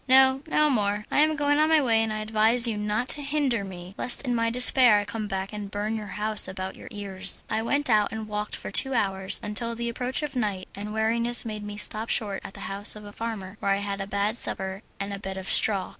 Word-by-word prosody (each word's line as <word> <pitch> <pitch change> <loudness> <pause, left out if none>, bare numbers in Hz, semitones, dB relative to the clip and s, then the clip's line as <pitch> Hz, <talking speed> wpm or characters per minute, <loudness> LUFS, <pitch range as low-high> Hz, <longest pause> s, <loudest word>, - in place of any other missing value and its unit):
"No, 265 +1 +6
no 305 -1 +3
more. 210 -3 0
I - - +2
am 310 +1 +4
going 290 0 +1
on 310 +1 +3
my 320 -1 +5
way, 230 -5 +2
and 225 -1 -1
I 215 0 -3
advise 220 +2 +5
you 230 -2 +2
not 210 +4 -2
to 295 - +2
hinder 280 -6 0
me, 185 -1 -9
lest 250 - +2
in 250 -3 -1
my 230 -1 +1
despair 250 -1 +6
I 205 - -1
come 210 +1 -5
back 195 0 -4
and 205 -1 -6
burn 210 +2 -3
your 210 -3 -6
house 215 -1 -2
about 190 0 -6
your - - -12
ears." 195 -2 -2
I 220 - 0
went 285 +5 -1
out 215 -3 +2
and 220 -1 -6
walked 210 0 -4
for - - -7
two 270 -1 +4
hours, 190 -3 0
until 230 +3 -3
the 235 0 -3
approach 250 +5 -2
of 285 -2 -5
night 205 -6 -2
and 205 +1 -7
weariness 230 +3 0
made 215 -2 -5
me 205 0 -7
stop 215 +2 -1
short 205 -4 -1
at - - -10
the - - -10
house 200 +2 -2
of 210 0 -10
a 205 - -10
farmer, 210 -3 -6
where 200 - +1
I - - 0
had 200 -1 -4
a 195 - -5
bad 205 +3 -1
supper 190 +1 +1 0.2
and 200 0 -4
a 200 - -6
bed 195 -1 -6
of 190 0 -6
straw. 200 -3 +4
215 Hz, 250 wpm, -26 LUFS, 200-240 Hz, 0.2 s, No